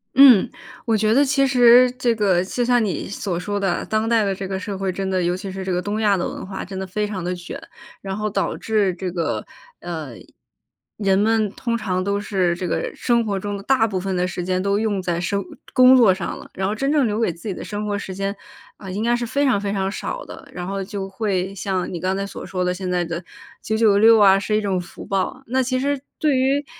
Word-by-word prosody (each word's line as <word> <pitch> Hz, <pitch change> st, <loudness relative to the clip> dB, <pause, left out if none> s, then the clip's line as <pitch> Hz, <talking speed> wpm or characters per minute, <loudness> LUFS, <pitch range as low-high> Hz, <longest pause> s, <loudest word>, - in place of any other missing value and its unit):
嗯， 260 Hz, -7 st, +8 dB, 0.4 s
我 225 Hz, -, +2 dB
觉 215 Hz, +1 st, +2 dB
得 280 Hz, +4 st, +5 dB
其 275 Hz, 0 st, +2 dB
实 250 Hz, -1 st, +6 dB
这 250 Hz, -2 st, 0 dB
个 190 Hz, -5 st, +2 dB
就 245 Hz, +6 st, -2 dB
像 245 Hz, -1 st, +3 dB
你 200 Hz, -4 st, -2 dB
所 190 Hz, -3 st, -3 dB
说 205 Hz, +3 st, -3 dB
的， 195 Hz, -3 st, -1 dB
当 215 Hz, +1 st, 0 dB
代 230 Hz, -2 st, +3 dB
的 195 Hz, -, 0 dB
这 190 Hz, 0 st, -5 dB
个 190 Hz, 0 st, -3 dB
社 200 Hz, 0 st, -5 dB
会， 190 Hz, -1 st, -1 dB
真 195 Hz, +1 st, -3 dB
的， 185 Hz, -1 st, 0 dB
尤 175 Hz, +1 st, +1 dB
其 190 Hz, +1 st, -6 dB
是 190 Hz, 0 st, -5 dB
这 190 Hz, -, -3 dB
个 180 Hz, 0 st, 0 dB
东 205 Hz, +3 st, -3 dB
亚 205 Hz, -2 st, +3 dB
的 175 Hz, -, -1 dB
文 -, -, -7 dB
化 190 Hz, 0 st, -6 dB
真 190 Hz, +1 st, -7 dB
的 190 Hz, -, -4 dB
非 210 Hz, +3 st, -1 dB
常 195 Hz, -4 st, -5 dB
得 180 Hz, +1 st, -2 dB
卷。 175 Hz, 0 st, -8 dB, 0.4 s
然 195 Hz, -1 st, -4 dB
后 215 Hz, 0 st, -1 dB
导 205 Hz, -, -1 dB
致 210 Hz, -4 st, +1 dB
这 185 Hz, 0 st, -4 dB
个， 170 Hz, -2 st, -2 dB, 0.3 s
呃， 160 Hz, -7 st, -6 dB, 0.8 s
人 195 Hz, -2 st, +2 dB
们 215 Hz, -1 st, +2 dB
通 235 Hz, 0 st, -2 dB
常 185 Hz, -4 st, -2 dB
都 200 Hz, +1 st, 0 dB
是 190 Hz, -4 st, 0 dB
这 180 Hz, +1 st, -4 dB
个 -, -, -2 dB
生 235 Hz, -1 st, +1 dB
活 200 Hz, -3 st, -2 dB
中 205 Hz, +1 st, -4 dB
的 -, -, -8 dB
大 260 Hz, -1 st, +3 dB
部 195 Hz, -4 st, -2 dB
分 190 Hz, 0 st, -2 dB
的 180 Hz, 0 st, +1 dB
时 180 Hz, 0 st, -4 dB
间 185 Hz, +1 st, 0 dB
都 200 Hz, +1 st, +1 dB
用 215 Hz, -3 st, 0 dB
在 175 Hz, -2 st, -1 dB
生 200 Hz, +2 st, -1 dB, 0.3 s
工 255 Hz, 0 st, +7 dB
作 235 Hz, -6 st, +6 dB
上 185 Hz, -2 st, -4 dB
了， -, -, -12 dB
然 190 Hz, 0 st, -1 dB
后 205 Hz, -, -1 dB
真 275 Hz, +6 st, -1 dB
正 295 Hz, -3 st, +3 dB
留 215 Hz, -1 st, -1 dB
给 225 Hz, -, +1 dB
自 170 Hz, +6 st, -10 dB
己 200 Hz, -, -1 dB
的 -, -, -7 dB
生 210 Hz, 0 st, -4 dB
活 205 Hz, -1 st, -1 dB
时 190 Hz, -2 st, -6 dB
间， 195 Hz, +1 st, -2 dB, 0.4 s
呃， 190 Hz, -2 st, -8 dB
应 205 Hz, +4 st, -3 dB
该 240 Hz, +1 st, +2 dB
是 240 Hz, -, -2 dB
非 280 Hz, +5 st, 0 dB
常 255 Hz, -7 st, +3 dB
非 200 Hz, -1 st, -2 dB
常 195 Hz, -1 st, -1 dB
少 -, -, -5 dB
的。 -, -, -11 dB
然 180 Hz, -, -6 dB
后 195 Hz, +1 st, -3 dB
就 195 Hz, 0 st, -5 dB
会 195 Hz, -2 st, -2 dB
像 190 Hz, -2 st, -2 dB
你 175 Hz, -, -4 dB
刚 185 Hz, +3 st, -1 dB
才 195 Hz, -, -2 dB
所 200 Hz, -, -8 dB
说 185 Hz, -1 st, -2 dB
的 180 Hz, -, +1 dB
现 185 Hz, 0 st, -5 dB
在 180 Hz, -1 st, 0 dB
的 170 Hz, +2 st, -5 dB, 0.4 s
996 220 Hz, 0 st, +5 dB
啊， 195 Hz, -1 st, +6 dB
是 210 Hz, +1 st, -1 dB
一 -, -, 0 dB
种 195 Hz, -3 st, 0 dB
福 175 Hz, -, -11 dB
报， 195 Hz, +7 st, -2 dB
那 260 Hz, +3 st, +1 dB
其 255 Hz, 0 st, 0 dB
实 280 Hz, +1 st, 0 dB, 0.2 s
对 300 Hz, -3 st, +2 dB
于 270 Hz, +3 st, +1 dB
200 Hz, 270 characters per minute, -21 LUFS, 185-225 Hz, 0.8 s, 嗯